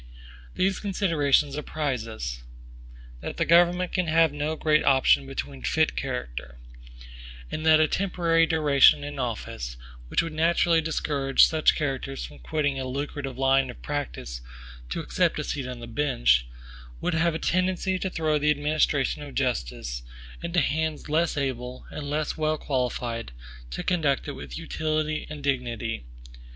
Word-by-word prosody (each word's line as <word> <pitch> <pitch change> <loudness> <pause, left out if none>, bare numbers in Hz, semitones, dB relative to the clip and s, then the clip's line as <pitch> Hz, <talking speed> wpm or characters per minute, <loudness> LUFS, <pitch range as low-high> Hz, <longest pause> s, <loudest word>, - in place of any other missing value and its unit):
These 190 0 +1
considerations 160 -8 +2
apprise 145 -5 -2
us, 60 - -5 0.8
that - - -6
the - - +1
government 175 +2 +4
can 180 -2 0
have 160 -1 +4
no 150 +2 -2
great 155 -1 +2
option 135 0 +4
between 135 0 -5
fit 160 -1 +1
character; 65 - -5 0.9
and 155 - -3
that 155 0 +7
a 155 - +4
temporary 170 -3 +2
duration 150 -3 +5
in 145 -1 -6
office, 60 - -4 0.3
which 65 - +1
would 165 -1 -5
naturally 165 +1 +3
discourage 145 -4 +3
such 160 -1 +3
characters 135 -2 -3
from 75 -1 -12
quitting 145 - -1
a 130 - -3
lucrative 140 0 -4
line 135 0 +3
of 125 - -10
practice 135 - -4 0.5
to - - -2
accept - - +1
a - - -2
seat 135 -3 -3
on 125 -1 -7
the - - -6
bench, 60 - +2 0.5
would 180 - -1
have 165 0 +2
a - - +1
tendency 185 +2 0
to 190 - -2
throw 155 -4 0
the 150 +1 +2
administration 150 -1 +1
of 145 -1 -9
justice 60 - -2 0.4
into 170 +1 +1
hands 155 +1 -1
less 160 +1 +1
able, 130 -2 -3
and 145 -1 -5
less 150 +1 -1
well 155 0 0
qualified, 120 - -2 0.4
to - - -5
conduct 150 -7 +1
it - - -2
with - - -8
utility 155 -1 -2
and 150 -2 -7
dignity. 120 - -2
145 Hz, 150 wpm, -26 LUFS, 130-160 Hz, 0.9 s, that